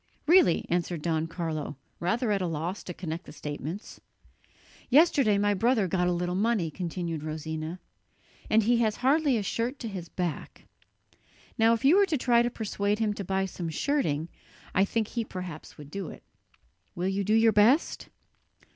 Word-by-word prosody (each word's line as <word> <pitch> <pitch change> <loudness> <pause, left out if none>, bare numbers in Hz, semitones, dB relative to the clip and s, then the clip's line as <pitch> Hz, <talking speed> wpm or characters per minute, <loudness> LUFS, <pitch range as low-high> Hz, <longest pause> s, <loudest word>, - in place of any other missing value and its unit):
"Really?" 330 - +5
answered 175 -2 -1
Don 160 -1 0
Carlo, 160 -4 -4 0.2
rather 220 +6 0
at 200 -2 +1
a 180 - 0
loss 165 +4 -3
to 180 - -5
connect 165 0 -5
the - - -9
statements. 150 +6 -7 0.9
"Yesterday 275 -7 +5
my 205 0 +2
brother 225 0 +2
got 180 0 +1
a - - +2
little 175 0 -1
money," 200 -4 +1
continued 170 -1 -4
Rosina, 155 +2 -5 0.7
"and 220 +1 +4
he 240 +3 +3
has 220 -2 +1
hardly 285 -2 +3
a 210 - -1
shirt 235 +7 -2
to 235 - -6
his 185 -5 -6
back. 175 -4 -4 0.9
Now 225 +1 +4
if 230 - -5
you 315 +8 +6
were 400 -1 +5
to 315 - 0
try 240 -2 +3
to 240 - +1
persuade 205 -3 -1
him 215 -2 0
to 200 - -5
buy 190 +1 0
some 175 -3 -5
shirting, 160 - -1 0.4
I 195 - +4
think 220 +1 -1
he 235 - -2
perhaps 180 -6 -8
would 145 -1 -11
do 195 -1 -4
it. - - -12 0.7
Will 180 +1 -1
you 195 +1 0
do 210 +3 +2
your 225 0 +5
best?" 235 +10 +3
195 Hz, 175 wpm, -28 LUFS, 170-230 Hz, 0.9 s, you